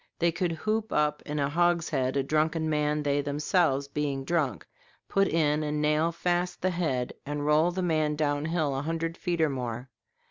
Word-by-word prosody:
They 170 0 +2
could 170 +1 -1
hoop 215 +6 -2
up 150 0 +1
in 150 0 -3
a 140 -1 +1
hogshead 160 -5 +1
a 135 - +2
drunken 155 +3 +1
man, 150 -1 0
they 145 0 +1
themselves 145 0 +1
being 140 -1 -2
drunk, 140 - -1 0.4
put 195 0 +2
in 155 -2 +2
and 150 0 -1
nail 150 +2 +2
fast 175 +1 -1
the 185 - +2
head, 155 -8 -1
and 145 0 -3
roll 155 +3 +4
the 185 +1 -2
man 155 -3 +1
down 145 -1 0
hill 160 -4 0
a 135 - -1
hundred 165 +2 -2
feet 175 -2 -2
or 155 - +4
more. 125 -1 -5
150 Hz, 185 wpm, -28 LUFS, 145-170 Hz, 0.4 s, roll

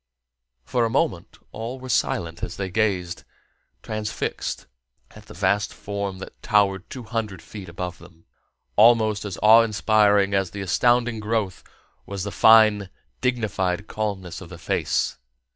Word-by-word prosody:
For 120 - 0
a 115 - +1
moment - - -1
all 115 +4 -6
were 130 - -9
silent 85 -8 -1
as - - -5
they 95 -2 -4
gazed, 90 -4 -1 0.6
transfixed, 110 0 -4 0.5
at - - -15
the - - -12
vast 100 +2 +1
form 100 -1 -5
that 95 - -11
towered 100 -2 +1
two 130 - -7
hundred 110 -4 -4
feet 95 +2 -10
above 90 +1 -6
them. 85 -1 -17 0.5
Almost 110 -1 +4
as 100 -2 -5
awe 110 +2 +8
inspiring 105 -2 +3
as 95 -2 +1
the 100 +3 -7
astounding 120 +4 +2
growth 105 -3 -2 0.4
was 100 -2 -4
the 100 - -4
fine, 110 -1 +5 0.3
dignified 100 -7 -1
calmness 100 -5 -4
of - - -10
the - - -9
face. - - -1
105 Hz, 145 wpm, -23 LUFS, 95-110 Hz, 0.6 s, awe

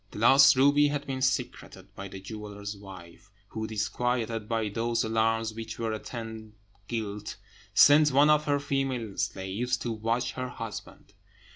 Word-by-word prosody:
The - - -11
lost 135 +5 +7
ruby 145 +2 +5
had 145 0 -3
been 135 -1 -4
secreted 130 -1 -3
by 100 - -7
the 95 0 -9
jeweller's 105 0 -7
wife, 95 -2 -13 0.2
who, 110 0 -4
disquieted 115 +1 -2
by 115 -2 0
those 115 +2 -1
alarms 110 0 0
which 110 0 -7
ever 115 -1 -1
attend 110 -1 -7 0.3
guilt, 105 -3 -4 0.4
sent 150 +1 +7
one 145 +3 +5
of 150 0 +3
her 145 -1 +1
female 135 -7 -2
slaves 105 +7 -2
to 120 0 -4
watch 115 +3 -1
her 130 0 -5
husband. 115 -3 -9
115 Hz, 150 wpm, -28 LUFS, 105-130 Hz, 0.4 s, lost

